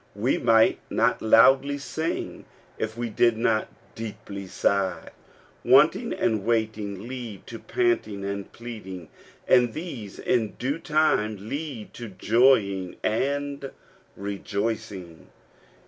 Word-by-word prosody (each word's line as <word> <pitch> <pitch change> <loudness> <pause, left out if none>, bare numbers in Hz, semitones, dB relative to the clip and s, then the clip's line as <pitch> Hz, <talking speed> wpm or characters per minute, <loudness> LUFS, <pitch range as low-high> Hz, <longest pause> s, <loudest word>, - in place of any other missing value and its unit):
We 115 +6 +1
might 115 -2 +4
not - - +1
loudly 135 +6 +5
sing 160 +3 -4 0.3
if 110 +1 -3
we 120 -1 -3
did 120 +1 +3
not 110 -1 +1 0.3
deeply 100 -3 -7
sigh. 95 -2 0 0.5
Wanting - - +5
and 110 -3 0
waiting 110 -2 -1
lead 120 -6 -7
to 115 - -8
panting 350 - 0
and 100 0 -4
pleading; 95 -8 -8 0.4
and 120 -2 +4
these 130 - -7
in 115 -4 0
due 140 +6 -2
time 110 -11 +1
lead 140 -5 -5
to 120 - -7
joying 100 -4 +2
and 140 +4 -1 0.5
rejoicing. 100 -3 -4
110 Hz, 110 wpm, -25 LUFS, 100-130 Hz, 0.5 s, loudly